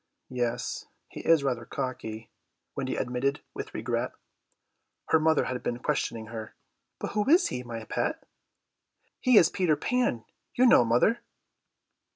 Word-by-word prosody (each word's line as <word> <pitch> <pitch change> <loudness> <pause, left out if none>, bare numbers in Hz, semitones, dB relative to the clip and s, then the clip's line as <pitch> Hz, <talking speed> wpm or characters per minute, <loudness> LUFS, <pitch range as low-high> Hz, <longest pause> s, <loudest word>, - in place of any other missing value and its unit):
"Yes, 120 -2 -2 0.2
he - - -9
is 165 -3 +4
rather 125 -4 -1
cocky," 115 -4 -5 0.4
Wendy - - -2
admitted 135 +4 -1
with - - -6
regret. - - -2 1.0
Her 160 - +5
mother 160 0 +3
had 125 -1 -3
been 120 - -2
questioning 120 -4 -2
her. 110 -1 -7 0.4
"But - - -4
who 210 +4 0
is 340 +4 +5
he, 125 - -3
my 115 -2 -6
pet?" - - -2 1.0
"He 255 -3 +5
is 165 - +7
Peter 175 -5 +2
Pan, 240 - 0 0.3
you 250 - +5
know, 235 - +7
mother." 120 - +3
130 Hz, 140 wpm, -28 LUFS, 120-165 Hz, 1.0 s, is